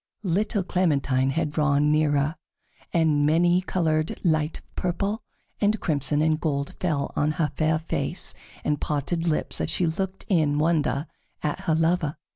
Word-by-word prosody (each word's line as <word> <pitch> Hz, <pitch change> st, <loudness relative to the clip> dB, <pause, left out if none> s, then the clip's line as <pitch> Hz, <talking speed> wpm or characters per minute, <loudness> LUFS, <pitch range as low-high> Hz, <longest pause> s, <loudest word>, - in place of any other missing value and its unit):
Little 200 Hz, +2 st, 0 dB
Clementine 140 Hz, -8 st, +1 dB
had 155 Hz, +2 st, -1 dB
drawn 150 Hz, -1 st, +2 dB
nearer, 150 Hz, 0 st, +2 dB, 0.6 s
and 155 Hz, -3 st, +3 dB
many 175 Hz, +4 st, +3 dB
colored 160 Hz, -4 st, 0 dB
light 155 Hz, -2 st, +1 dB
of -, -, -22 dB
purple 195 Hz, +5 st, -1 dB, 0.4 s
and 210 Hz, +1 st, +2 dB
crimson 145 Hz, -1 st, +1 dB
and 155 Hz, -1 st, +2 dB
gold 140 Hz, -3 st, -2 dB
fell 155 Hz, -6 st, -1 dB
on 150 Hz, +1 st, +1 dB
her 155 Hz, -1 st, 0 dB
fair 155 Hz, 0 st, +2 dB
face 160 Hz, -, -2 dB, 0.3 s
and 150 Hz, -1 st, 0 dB
parted 165 Hz, +3 st, -1 dB
lips 155 Hz, -, 0 dB
as -, -, -1 dB
she 175 Hz, +2 st, +2 dB
looked 190 Hz, +4 st, -3 dB
in 155 Hz, -6 st, +2 dB
wonder 155 Hz, -2 st, +1 dB, 0.4 s
at 150 Hz, -, -1 dB
her 160 Hz, -, +2 dB
lover. 165 Hz, -2 st, +1 dB
155 Hz, 150 wpm, -25 LUFS, 150-175 Hz, 0.6 s, and